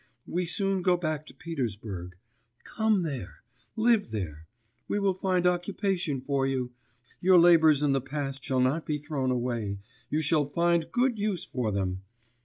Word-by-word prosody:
We 180 0 -2
soon 195 +1 0
go 180 0 +3
back 155 -3 -3
to - - -12
Petersburg, 105 - -5 0.5
come 220 -4 +1
there, 130 - -6 0.3
live 225 -2 +3
there, 80 -7 -5 0.4
we - - -1
will 200 -2 +2
find 185 -1 0
occupation 180 -4 0
for 135 0 0
you, 130 -2 -2 0.5
your 185 0 +5
labours 160 -4 +6
in 145 - +3
the 135 -1 +2
past 135 0 -4
shall 130 -1 +1
not 140 +6 +1
be 150 - -2
thrown 145 -3 -2
away, 120 -5 -1 0.3
you 155 +1 0
shall 150 -1 +2
find 170 +1 +1
good 245 -2 +1
use 205 -4 -1
for 120 -4 -2
them 95 -2 -2
150 Hz, 160 wpm, -28 LUFS, 130-180 Hz, 0.5 s, labours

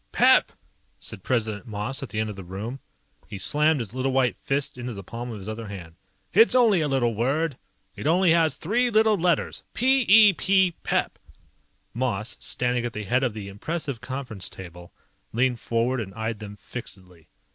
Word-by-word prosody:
_ - - -43
"PEP!" - - +5 0.5
said - - -9
President 110 -3 -1
Moss 110 +5 -3
at 135 - -6
the 105 - -3
end 110 0 -1
of - - -9
the 95 - -8
room. 105 +9 -6 0.5
He 100 - -7
slammed 150 - +2
his 115 -3 -5
little 130 +1 -1
white 130 -2 +2
fist 140 +1 -1
into 125 -1 -5
the 100 - -8
palm 120 +5 -6
of 115 - -6
his 100 0 -9
other 110 0 -5
hand. 90 -5 -9 0.4
"It's 225 +5 +6
only 225 -8 +5
a 150 - +1
little 130 -4 +1
word. 135 +7 0 0.4
It - - -4
only 175 +2 +4
has 165 -4 +3
three 240 +8 +1
little 220 -1 +4
letters. 175 -3 0
P 265 +2 +3
E 210 -1 +8
P. 190 +1 +3
Pep!" - - -1 0.7
Moss, 115 -3 -2
standing 125 -1 -1
at 120 -1 -3
the 105 - -4
head 125 +6 +1
of 120 -5 -1
the 105 -2 -6
impressive 140 +5 -4
conference 125 -6 -5
table, 90 -2 -11 0.4
leaned 125 +1 +1
forward 120 +2 0
and 95 -2 -8
eyed 110 -1 -3
them 105 -1 -8
fixedly. 95 -8 -9
125 Hz, 190 wpm, -25 LUFS, 105-155 Hz, 0.7 s, E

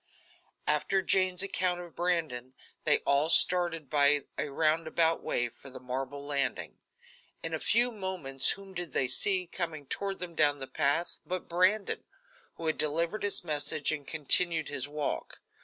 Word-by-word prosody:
After 185 +6 +1
Jane's 185 -1 +2
account 185 -2 -1
of 175 -2 -10
Brandon, 160 -8 -2 0.3
they - - +4
all 140 +3 +3
started 170 -3 +3
by 145 0 +3
a 150 - -2
roundabout 160 +2 +1
way 120 - -1
for 135 - -13
the 130 - -10
marble 135 +2 -5
landing. 140 -2 -3 0.6
In 165 - -4
a 160 - -1
few 240 +7 +3
moments 185 - +1
whom 195 -1 -12
did 175 -6 -5
they 130 - +1
see, 185 +8 +2
coming 165 -4 -5
toward 195 +7 -3
them 180 -2 -6
down 150 -2 +3
the 135 - -5
path, 145 +6 -1
but 185 0 -5
Brandon, 185 +4 +1 0.5
who 165 - -8
had 155 - 0
delivered 165 +7 0
his 205 -3 +3
message 150 -2 -1
and 145 -3 -5
continued 160 +1 +2
his 145 -1 -3
walk. 145 0 -4
160 Hz, 155 wpm, -30 LUFS, 145-180 Hz, 0.6 s, they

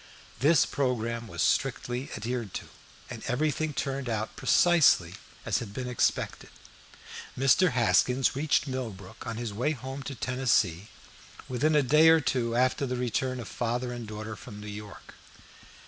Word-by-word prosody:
This 150 +6 +5
programme 115 -3 -2
was - - -2
strictly 130 -1 0
adhered 115 -1 -4
to, - - -6 0.4
and - - -8
everything 155 +4 0
turned 135 -2 -3
out 110 -1 -3
precisely 155 - +4 0.3
as - - +1
had 105 -3 -8
been 130 -1 -4
expected. 125 -2 -1 0.9
Mr. 135 +5 +4
Haskins 125 +2 +3
reached 150 +3 +1
Millbrook 115 -8 -6
on 115 -1 -4
his 115 -3 -4
way 125 +9 0
home 135 +1 -7
to 135 0 -6
Tennessee 120 -9 +1 0.6
within 145 +5 +1
a 150 - +4
day 150 +5 +6
or 165 0 +6
two 120 -5 -1
after 130 +2 +1
the 125 - -2
return 130 +1 -1
of 115 - -7
father 125 +3 -2
and 120 -2 -7
daughter 110 +1 -6
from 105 -3 -10
New 105 - -9
York. 105 0 -9
125 Hz, 150 wpm, -28 LUFS, 115-135 Hz, 0.9 s, day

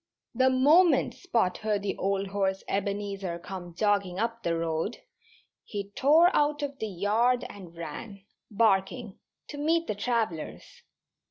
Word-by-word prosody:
The 260 +2 +4
moment 300 +7 +4
Spot 230 - 0
heard 210 -2 -1
the 205 - -2
old 195 +1 0
horse 195 -1 -1
Ebenezer 200 -2 -2
come 175 -1 -8
jogging 200 -2 +1
up 230 +2 -2
the 170 -4 0
road 165 +6 -2 0.7
he 200 -2 -6
tore 315 - +5
out 295 0 +2
of 280 -1 -4
the 220 - -2
yard 220 +7 +1
and 180 -4 -12
ran, 190 +5 -7 0.3
barking, 210 0 +1 0.3
to 290 - -7
meet 330 +3 +2
the - - -2
travellers. 215 -6 -3
205 Hz, 140 wpm, -28 LUFS, 190-250 Hz, 0.7 s, tore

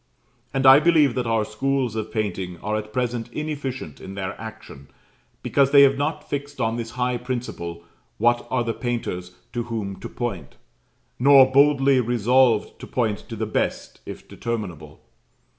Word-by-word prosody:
And 135 0 -1
I 135 +2 +9
believe 155 -4 +4
that 125 -1 -2
our 115 -1 +1
schools 130 +1 -1
of 110 -1 -4
painting 95 -5 -3
are 105 +1 -1
at 110 0 -4
present 120 -1 -2
inefficient 140 - -5
in 95 - -8
their 95 0 -4
action, 110 -11 -10 0.6
because 140 -1 +3
they 140 0 +7
have 135 0 +5
not 150 +2 -3
fixed 145 -1 -5
on 115 -2 0
this 115 -1 -4
high 125 0 0
principle 120 -9 -5 0.3
what 120 +2 +2
are 120 - 0
the 115 -1 -2
painters 90 -8 -4 0.2
to 120 -1 -2
whom 110 -4 -4
to - - -7
point; - - -5 0.6
nor 135 0 +7
boldly 140 -1 +4
resolved 120 -1 +2
to - - -9
point 110 -5 -1
to 115 - -5
the 110 0 -2
best, 110 - -3
if - - -9
determinable. 105 -9 -6
120 Hz, 160 wpm, -23 LUFS, 110-135 Hz, 0.6 s, I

